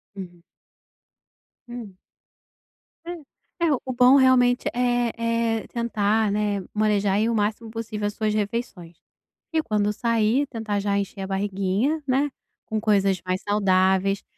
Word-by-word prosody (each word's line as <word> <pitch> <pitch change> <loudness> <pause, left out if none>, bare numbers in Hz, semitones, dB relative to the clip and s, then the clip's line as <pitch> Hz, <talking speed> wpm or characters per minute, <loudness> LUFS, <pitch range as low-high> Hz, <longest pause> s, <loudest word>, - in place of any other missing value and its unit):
Uhum. 175 -3 -9 1.3
Hum. 230 -6 -9 1.1
É, 340 0 -7
é - - +2
o 260 - -3
bom 250 +2 +6
realmente 255 -2 +4
é 245 -1 +1 0.4
é 220 - -5
tentar, 220 -2 0
né, 205 -1 0
manejar 210 -2 +1
aí 215 +3 +2
o 230 - 0
máximo 215 +2 -1
possível 220 -2 -4
as 205 - -4
suas 215 -1 -1
refeições. 205 -5 -4 0.6
E 320 - +2
quando 210 -3 0
sair, 230 +4 +1
tentar 220 -5 -3
já 200 0 0
encher 200 0 -4
a 190 - -4
barriguinha, 200 +9 -1
né, 275 +3 +2 0.4
com 220 0 -2
coisas 195 -3 +2
mais 185 +1 -1
saudáveis. 195 -1 +2
215 Hz, 135 wpm, -24 LUFS, 200-240 Hz, 1.3 s, bom